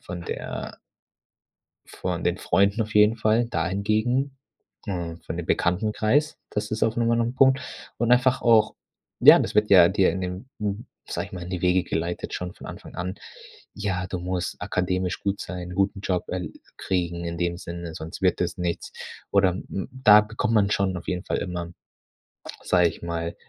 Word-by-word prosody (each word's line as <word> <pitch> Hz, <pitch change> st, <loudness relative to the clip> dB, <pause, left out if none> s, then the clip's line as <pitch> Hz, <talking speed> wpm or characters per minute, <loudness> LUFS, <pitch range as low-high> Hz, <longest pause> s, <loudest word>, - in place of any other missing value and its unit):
von 85 Hz, -1 st, -7 dB
der -, -, -5 dB, 1.1 s
von -, -, -4 dB
den -, -, +1 dB
Freunden 100 Hz, +3 st, +2 dB
auf 110 Hz, 0 st, -8 dB
jeden 105 Hz, +2 st, +5 dB
Fall, 110 Hz, +2 st, +2 dB
dahingegen, 110 Hz, -, 0 dB, 0.5 s
äh, 85 Hz, -4 st, -3 dB
von 85 Hz, -, -5 dB
dem 85 Hz, -1 st, -5 dB
Bekanntenkreis, 110 Hz, -, +1 dB
das 105 Hz, 0 st, -3 dB
ist 110 Hz, -, -3 dB
auf 115 Hz, 0 st, +2 dB
noch 115 Hz, -1 st, +1 dB
mal 115 Hz, 0 st, +3 dB
'nen 120 Hz, +2 st, 0 dB
Punkt 130 Hz, 0 st, +5 dB, 0.4 s
und 120 Hz, 0 st, +1 dB
einfach 125 Hz, +1 st, +3 dB
auch 110 Hz, -2 st, +4 dB, 0.4 s
ja, -, -, +9 dB
das -, -, -2 dB
wird 105 Hz, 0 st, +3 dB
ja 90 Hz, -3 st, +8 dB
dir 95 Hz, -1 st, +3 dB
in 95 Hz, +3 st, -3 dB
dem 90 Hz, +7 st, -5 dB
m 105 Hz, +2 st, -3 dB, 0.2 s
sage -, -, -3 dB
ich -, -, -24 dB
mal, 90 Hz, -1 st, -6 dB
in 90 Hz, -, -8 dB
die 90 Hz, -1 st, -4 dB
Wege 90 Hz, 0 st, +3 dB
geleitet 85 Hz, +1 st, -3 dB
schon 90 Hz, 0 st, -4 dB
von -, -, -12 dB
Anfang -, -, -10 dB
an. 90 Hz, +2 st, -3 dB, 0.6 s
„Ja, 95 Hz, -3 st, -2 dB
du 90 Hz, -, -3 dB
musst 90 Hz, 0 st, -3 dB
akademisch 90 Hz, 0 st, -1 dB
gut 100 Hz, 0 st, -1 dB
sein, 90 Hz, -1 st, -6 dB
guten 100 Hz, +1 st, 0 dB
Job, 90 Hz, -2 st, -1 dB
äh, 90 Hz, -1 st, -3 dB, 0.3 s
kriegen 85 Hz, -2 st, -2 dB
in 85 Hz, 0 st, -4 dB
dem 85 Hz, 0 st, -1 dB
Sinne, 85 Hz, -1 st, -7 dB
sonst 80 Hz, +2 st, -7 dB
wird 90 Hz, -1 st, +2 dB
es 90 Hz, +1 st, -1 dB
nichts." 85 Hz, -1 st, -3 dB, 0.4 s
Oder 100 Hz, -2 st, +4 dB
m 90 Hz, -, -6 dB
m 95 Hz, -, -4 dB
da 105 Hz, -5 st, +7 dB
k 110 Hz, +1 st, -11 dB
kommt 115 Hz, -, +1 dB
man 100 Hz, -1 st, +3 dB
schon 95 Hz, -3 st, +1 dB
auf 85 Hz, -, -8 dB
jeden 90 Hz, +1 st, -2 dB
Fall -, -, -1 dB
immer, 85 Hz, -2 st, -4 dB, 0.9 s
sage 90 Hz, -1 st, +4 dB
ich -, -, -11 dB
mal, 85 Hz, 0 st, -3 dB
95 Hz, 190 wpm, -25 LUFS, 90-110 Hz, 1.1 s, ja